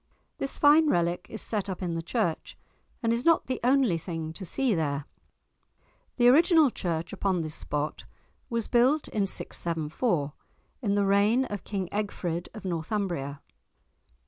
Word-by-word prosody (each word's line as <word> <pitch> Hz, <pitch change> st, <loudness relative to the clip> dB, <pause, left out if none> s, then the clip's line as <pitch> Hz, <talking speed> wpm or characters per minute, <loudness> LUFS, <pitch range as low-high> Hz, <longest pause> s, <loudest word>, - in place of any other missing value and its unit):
This 275 Hz, -, -3 dB
fine 300 Hz, +1 st, +6 dB
relic 175 Hz, -2 st, 0 dB
is 220 Hz, -, -4 dB
set 205 Hz, -3 st, -2 dB
up 185 Hz, -, -4 dB
in 175 Hz, -2 st, -2 dB
the 165 Hz, -, -2 dB
church, 175 Hz, -2 st, -2 dB, 0.5 s
and 230 Hz, 0 st, +2 dB
is 235 Hz, +1 st, -1 dB
not 330 Hz, +1 st, +4 dB
the 255 Hz, -1 st, -3 dB
only 250 Hz, -9 st, +3 dB
thing 160 Hz, -2 st, -5 dB
to 190 Hz, -, -7 dB
see 250 Hz, +6 st, 0 dB
there. 145 Hz, -4 st, -1 dB, 1.1 s
The 240 Hz, -1 st, +5 dB
original 315 Hz, +1 st, +6 dB
church 170 Hz, -4 st, -3 dB
upon 190 Hz, -3 st, 0 dB
this 155 Hz, -1 st, -5 dB
spot 150 Hz, -1 st, -3 dB, 0.4 s
was 230 Hz, -3 st, -1 dB
built 260 Hz, +5 st, +3 dB
in 205 Hz, -2 st, 0 dB
674, 165 Hz, -, -2 dB, 0.5 s
in 205 Hz, -5 st, +1 dB
the 200 Hz, -1 st, +2 dB
reign 205 Hz, +6 st, +3 dB
of 205 Hz, -5 st, -5 dB
King 195 Hz, -3 st, -3 dB
Egfrid 180 Hz, -5 st, -3 dB
of 215 Hz, -, -9 dB
Northumbria. 170 Hz, -5 st, -2 dB
200 Hz, 150 wpm, -28 LUFS, 165-240 Hz, 1.1 s, fine